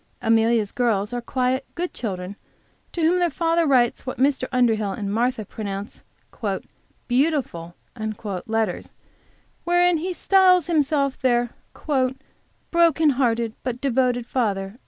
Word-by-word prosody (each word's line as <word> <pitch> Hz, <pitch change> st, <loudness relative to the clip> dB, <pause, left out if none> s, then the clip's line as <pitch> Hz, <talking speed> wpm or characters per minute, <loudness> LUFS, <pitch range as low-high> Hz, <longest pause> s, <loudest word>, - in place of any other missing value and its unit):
Amelia's 225 Hz, -2 st, +2 dB
little 245 Hz, -, -1 dB
girls 210 Hz, 0 st, 0 dB
are 245 Hz, -, -2 dB
quiet, 255 Hz, +2 st, -1 dB
good 355 Hz, +1 st, -3 dB
children, 190 Hz, -3 st, -5 dB, 0.6 s
to 335 Hz, -, -3 dB
whom 345 Hz, +3 st, +3 dB
their 350 Hz, -1 st, +2 dB
father 330 Hz, +1 st, +1 dB
writes 250 Hz, -4 st, +2 dB
what 255 Hz, -, -5 dB
Mr. 265 Hz, -1 st, +1 dB
Underhill 225 Hz, -6 st, +1 dB
and 200 Hz, -2 st, -4 dB
Martha 235 Hz, -1 st, 0 dB
pronounce 200 Hz, 0 st, -6 dB, 1.0 s
"beautiful" 245 Hz, -, 0 dB, 0.7 s
letters, 220 Hz, -4 st, -2 dB, 0.7 s
wherein 350 Hz, 0 st, +3 dB
he 320 Hz, -, -4 dB
always 365 Hz, -, -3 dB
styles 370 Hz, -3 st, +4 dB
himself 290 Hz, -4 st, 0 dB
their 240 Hz, -2 st, +2 dB, 1.2 s
"broken 330 Hz, -2 st, +4 dB
hearted 235 Hz, -4 st, 0 dB
but 250 Hz, -1 st, -4 dB
devoted 250 Hz, -2 st, +1 dB
father." 205 Hz, -4 st, -2 dB
250 Hz, 125 wpm, -23 LUFS, 225-310 Hz, 1.2 s, styles